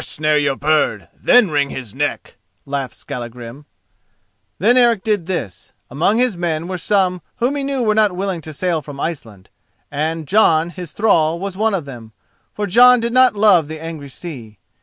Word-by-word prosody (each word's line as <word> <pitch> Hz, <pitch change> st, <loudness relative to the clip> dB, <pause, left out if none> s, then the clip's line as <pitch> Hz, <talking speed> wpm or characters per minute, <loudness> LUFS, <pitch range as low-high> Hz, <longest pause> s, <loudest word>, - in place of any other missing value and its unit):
"First -, -, -2 dB
snare 155 Hz, 0 st, +2 dB
your 145 Hz, -2 st, 0 dB
bird, 140 Hz, -, 0 dB
then 245 Hz, -8 st, +3 dB
wring 145 Hz, -1 st, +1 dB
his 125 Hz, -6 st, -7 dB
neck," -, -, -3 dB, 0.3 s
laughed 140 Hz, -2 st, -4 dB
Skallagrim. 120 Hz, +3 st, -8 dB, 0.9 s
Then 230 Hz, +7 st, +3 dB
Eric 235 Hz, -5 st, +3 dB
did 210 Hz, -6 st, -1 dB
this: 120 Hz, -, -5 dB, 0.2 s
among 165 Hz, -, +1 dB
his 245 Hz, -4 st, +1 dB
men 170 Hz, -1 st, -2 dB
were 185 Hz, -1 st, -4 dB
some 185 Hz, -1 st, 0 dB
who 250 Hz, +3 st, 0 dB
he 285 Hz, -1 st, -3 dB
knew 275 Hz, -2 st, -2 dB
were 215 Hz, -2 st, +2 dB
not 210 Hz, -3 st, +2 dB
willing 190 Hz, -2 st, -3 dB
to 155 Hz, -, -8 dB
sail 165 Hz, +1 st, -1 dB
from 145 Hz, -1 st, -10 dB
Iceland, 115 Hz, -, -6 dB, 0.4 s
and 155 Hz, +2 st, -3 dB
Jon, 170 Hz, -5 st, +3 dB
his 175 Hz, -3 st, -8 dB
thrall, 170 Hz, -6 st, +2 dB
was 195 Hz, 0 st, -5 dB
of 200 Hz, -5 st, 0 dB
them, 115 Hz, -5 st, -11 dB, 0.4 s
for 210 Hz, -, -2 dB
Jon 245 Hz, +5 st, +6 dB
did 235 Hz, +1 st, -2 dB
not 255 Hz, -2 st, +5 dB
love 200 Hz, -7 st, +4 dB
the 155 Hz, 0 st, -7 dB
angry 160 Hz, -3 st, -8 dB
sea. 125 Hz, -, -9 dB
170 Hz, 180 wpm, -18 LUFS, 145-210 Hz, 0.9 s, Jon